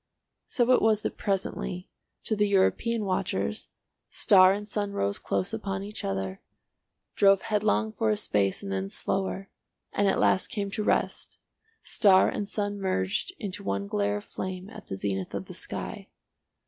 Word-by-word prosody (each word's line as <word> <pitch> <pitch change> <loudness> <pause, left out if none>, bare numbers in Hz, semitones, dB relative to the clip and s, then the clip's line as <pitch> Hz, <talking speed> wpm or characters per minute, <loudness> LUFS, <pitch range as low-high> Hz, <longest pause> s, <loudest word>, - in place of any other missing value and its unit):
So 245 -1 +2
it 255 - +5
was 215 -1 +3
that - - -2
presently, 190 -2 -2 0.4
to 220 - 0
the 210 0 +2
European 210 +3 +2
watchers, 105 - -1 0.4
star 185 -2 +6
and 205 +1 -3
sun 205 -1 -2
rose 100 - -1
close 95 -2 -1
upon 195 -1 -3
each 210 +1 -6
other, 95 -1 -3 0.7
drove 195 -1 +5
headlong 215 +1 +1
for 220 +1 0
a 215 - +2
space 100 - 0
and 100 - -5
then 95 0 -2
slower, 195 - -2 0.4
and 205 - +2
at 195 - +2
last 190 - +3
came 205 -4 -3
to 210 +1 -2
rest, - - 0 0.5
star 190 -3 +5
and 205 -1 -3
sun 205 -1 -2
merged 185 - -1
into 200 -5 -5
one 100 0 -1
glare 100 0 0
of 105 - -8
flame 185 +2 -5
at - - -11
the 95 - -4
zenith 95 -1 -3
of - - -4
the - - -9
sky. - - -6
195 Hz, 165 wpm, -28 LUFS, -, 0.7 s, star